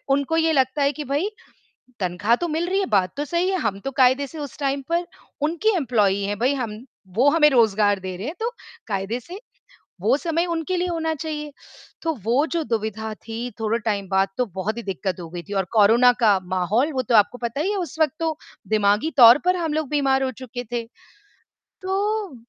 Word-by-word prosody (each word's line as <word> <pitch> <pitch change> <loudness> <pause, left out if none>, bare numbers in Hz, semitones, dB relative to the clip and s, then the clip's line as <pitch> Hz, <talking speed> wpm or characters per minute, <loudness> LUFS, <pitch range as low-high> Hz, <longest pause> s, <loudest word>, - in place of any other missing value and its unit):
उनको 280 +3 +1
ये 325 0 +3
लगता 265 0 +1
है 280 +1 +3
कि, 300 0 -6
भाई 290 +9 -1 0.7
तनख्वाह 190 +5 +1
तो 345 - -3
मिल 330 +2 -1
रही 385 +1 +1
है। 390 - +1
बात 185 -3 +2
तो 290 - -2
सही 345 +4 0
है 380 - 0
हम 200 -4 -2
तो 270 - -2
कायदे 260 +2 +4
से 320 +1 -10
उस 285 -4 -7
टाइम 275 0 -1
पर 340 +1 +1 0.4
उनकी 345 +8 +1
एम्प्लॉयी 210 - +1
हैं 205 +1 -2
भाई, 260 +4 +2
हम 230 -2 -5 0.3
वो 255 +6 +5
हमें 300 0 +5
रोज़गार 210 -5 +3
दे 185 -1 -6
रहे 210 +8 -5
हैं 325 - -5
तो 465 +2 -1 0.4
कायदे 200 +3 -2
से, 360 - -10 0.6
वो 225 +7 +3
समय 335 +1 0
उनके 340 +1 -2
लिए 360 - 0
होना 320 -2 -1
चाहिए, 300 -1 -5 0.5
तो 325 -1 0
वो 245 +8 +2
जो 330 -2 0
दुविधा 220 -2 -3
थी, 230 +3 -6
थोड़े 225 +1 0
टाइम 200 -3 -1
बाद 190 0 +2
तो 250 - +1
बहुत 210 +5 -2
ही 235 - -5
दिक्कत 190 -1 -3
हो 165 - -8
गई 175 +1 -7
थी - - -4
और - - -6
कोरोना 230 +4 +6
का 205 -4 +4
माहौल 215 - +1
वो 260 - 0
तो 240 -1 0
आपको 210 +3 +4
पता 240 +4 -3
ही 385 - 0
है, 410 - -1
उस 330 -4 -5
वक़्त 305 -4 +3
तो 320 -2 -1 0.3
दिमागी 210 +7 +2
तौर 235 -1 +9
पर 365 0 +3
हम 330 -3 -2
लोग 310 -3 -2
बीमार 270 -2 +2
हो 260 - -1
चुके 245 0 -6
थे। 240 -1 -1 1.0
तो 380 +1 -1 0.3
उ 275 - -13
255 Hz, 215 wpm, -23 LUFS, 215-315 Hz, 1.0 s, तौर